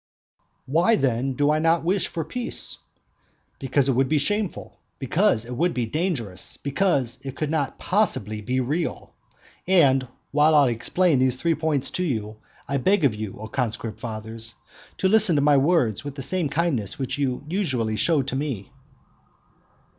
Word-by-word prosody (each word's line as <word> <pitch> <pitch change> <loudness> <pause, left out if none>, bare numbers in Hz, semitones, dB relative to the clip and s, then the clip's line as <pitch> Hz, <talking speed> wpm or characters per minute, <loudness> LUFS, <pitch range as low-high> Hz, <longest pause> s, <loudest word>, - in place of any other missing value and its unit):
Why 170 - +3
then 135 - 0
do 145 +3 +2
I 155 - +2
not 165 +1 +2
wish 185 +3 +1
for 165 -2 -4
peace? 245 +5 -3 0.8
Because 135 0 +1
it - - +3
would 130 +1 +1
be 155 - +3
shameful; 205 +6 -2 0.2
because 140 - +1
it 125 +1 -6
would 170 +6 0
be 120 -2 0
dangerous; 135 - -3
because 140 -5 0
it 135 -1 -7
cannot 155 -2 -1
possibly 110 - 0
be 125 +4 -1
real. 155 +7 -3 0.5
And 135 -8 +4 0.2
while 150 +2 +4
I 140 -4 +5
explain 150 +6 +1
these 130 -1 +2
three 170 -1 +2
points 155 -4 -1
to 180 - -2
you, 110 -9 -3 0.3
I 140 - 0
beg 185 +5 +2
of 130 - +3
you, 105 -2 -6
O 110 - -6
conscript 115 -2 -3
fathers, 110 -1 -6 0.4
to 190 - +2
listen 195 -4 +5
to 145 - +3
my 145 -1 +5
words 135 - +2
with 145 -1 -6
the 135 - -4
same 170 +2 0
kindness 135 - -1
which 135 +1 -3
you 130 -2 -1
usually 130 - -1
show 150 +4 +2
to 130 +1 -4
me. 130 -6 -4
140 Hz, 165 wpm, -24 LUFS, 120-165 Hz, 0.8 s, I